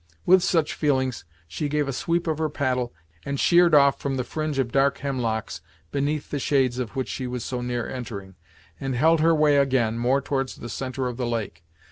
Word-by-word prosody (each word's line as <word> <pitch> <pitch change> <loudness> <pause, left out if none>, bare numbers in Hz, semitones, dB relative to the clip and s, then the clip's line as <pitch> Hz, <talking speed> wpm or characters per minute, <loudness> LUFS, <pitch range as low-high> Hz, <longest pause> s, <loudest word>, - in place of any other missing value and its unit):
With 185 +1 +6
such 170 -4 +1
feelings 130 - 0 0.2
she 90 - -3
gave 150 -1 0
a 135 - -2
sweep 170 +4 -1
with 160 -2 -1
her 155 -1 0
paddle, 130 -4 -1 0.3
and 140 -1 -3
sheered 175 -2 +5
off 140 -1 +5
from 135 -1 -2
the 130 - -1
fringe 155 +3 -3
of 130 -3 0
dark 140 +2 +2
hemlocks 115 -9 -3 0.3
beneath 145 +1 -2
the 145 - -1
shades 130 -3 +1
of 120 -5 -4
which 130 -1 -2
she 130 - -4
was 125 -2 -4
so 125 -1 -3
near 120 -1 -2
entering, 110 -7 -7 0.5
and 135 -1 -3
held 160 +6 +4
her 165 +1 +4
way 150 -2 +4
again, 130 -5 +2
more 125 +3 +2
towards 135 -1 -2
the 120 - -8
centre 130 +1 -3
of 125 -1 -5
the 125 -2 -2
lake. 105 -9 -4
135 Hz, 205 wpm, -24 LUFS, 125-150 Hz, 0.5 s, With